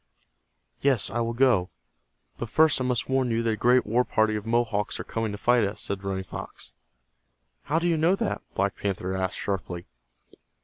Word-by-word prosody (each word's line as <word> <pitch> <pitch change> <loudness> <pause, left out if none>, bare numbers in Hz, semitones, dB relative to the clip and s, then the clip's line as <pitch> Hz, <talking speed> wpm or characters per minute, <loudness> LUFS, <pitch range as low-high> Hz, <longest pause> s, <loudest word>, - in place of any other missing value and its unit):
"Yes, 135 -8 +3
I 120 - -1
will 115 0 -1
go, 120 -8 +3 0.7
but 120 - -4
first 155 -1 +4
I - - +1
must 125 -3 0
warn 130 -1 +1
you 115 0 0
that 115 - +1
a - - 0
great 125 +3 +3
war 120 +4 +2
party 110 -2 +1
of 105 +1 -5
Mohawks 115 -3 0
are - - -3
coming 115 -1 -3
to 100 - -5
fight 120 +2 +3
us," 100 +1 -2
said 100 -1 -2
Running 95 -1 -2
Fox. - - -9 0.9
"How 150 - 0
do 170 +1 +1
you 165 -2 +2
know 165 +5 +3
that?" 225 +2 -2
Black 100 0 0
Panther 95 -1 -3
asked, 95 -1 -2
sharply. 90 -3 -4
115 Hz, 190 wpm, -26 LUFS, 100-125 Hz, 0.9 s, first